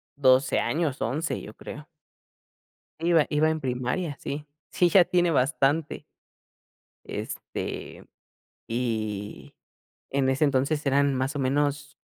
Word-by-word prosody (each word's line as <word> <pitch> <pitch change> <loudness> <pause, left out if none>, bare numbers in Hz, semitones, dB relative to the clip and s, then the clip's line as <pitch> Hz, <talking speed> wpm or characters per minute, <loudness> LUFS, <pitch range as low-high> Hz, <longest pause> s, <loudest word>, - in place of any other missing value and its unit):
12 130 -1 +4
años, 155 -4 -1
11, 150 +9 -1
yo 105 - -10
creo. 150 +5 -9 1.1
Iba 165 -2 +4
iba 155 +1 +3
en 160 0 -1
primaria, 135 +5 -2
sí. 145 +1 -5 0.3
Sí, 175 -1 +3
ya 180 0 +6
tiene 175 -1 +2
bastante. 145 +2 +1 1.0
Este, - - -6 0.6
y 110 -4 -3 0.6
en 135 -1 +1
ese 135 +3 +2
entonces 140 +2 +1
eran 140 0 +3
más 130 +3 -1
o - - -1
menos, 145 +2 -1
140 Hz, 115 wpm, -26 LUFS, 130-155 Hz, 1.1 s, ya